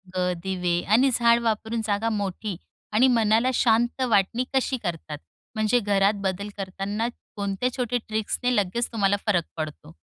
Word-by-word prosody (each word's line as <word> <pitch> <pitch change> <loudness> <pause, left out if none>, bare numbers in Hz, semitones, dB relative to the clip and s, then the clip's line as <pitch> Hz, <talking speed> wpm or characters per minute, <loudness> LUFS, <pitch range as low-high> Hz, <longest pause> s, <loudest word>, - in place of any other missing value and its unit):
अ, 180 0 +1
दिवे 180 -2 0
आणि 260 +4 +5
झाडं 235 0 +4
वापरून 225 +1 -1
जागा 215 +2 0
मोठी 205 -2 -3 0.4
आणि 225 +5 +5
मनाला 230 0 +3
शांत 240 +2 +2
वाटणी 230 0 +2
कशी 265 0 +1
करतात? 160 -3 -4 0.4
म्हणजे 215 +3 +2
घरात 200 -1 +2
बदल 195 +2 -2
करताना 195 +3 -3 0.3
कोणत्या 200 +4 -1
छोट्या 245 -1 0
ट्रिक्सने 220 +3 -1
लगेच 210 +5 0
तुम्हाला 200 -2 +2
फरक 180 -5 +3
पडतो? 155 - -6
215 Hz, 145 wpm, -25 LUFS, 195-235 Hz, 0.4 s, आणि